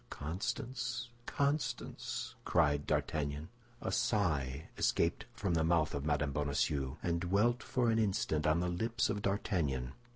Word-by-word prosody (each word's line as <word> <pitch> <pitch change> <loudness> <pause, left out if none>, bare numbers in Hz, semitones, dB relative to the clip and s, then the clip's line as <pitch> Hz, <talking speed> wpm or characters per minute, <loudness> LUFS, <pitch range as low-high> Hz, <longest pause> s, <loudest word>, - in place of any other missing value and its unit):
"Constance, 120 - -3 0.2
Constance!" 140 0 -1
cried 75 0 +2
D'Artagnan. 75 +1 -1 0.3
A - - -2
sigh 80 - +1
escaped - - +1
from 95 -4 -1
the 80 -1 +3
mouth 80 -2 +3
of 70 +1 -2
Mme. 75 -1 +1
Bonacieux, 70 -1 0
and 85 -1 0
dwelt 105 +7 +2
for 120 -2 +1
an 115 - +2
instant 95 -7 +1
on 80 +2 +3
the 90 - 0
lips 115 +8 0
of 105 -2 -2
D'Artagnan. 75 -11 0
85 Hz, 135 wpm, -34 LUFS, 75-110 Hz, 0.3 s, the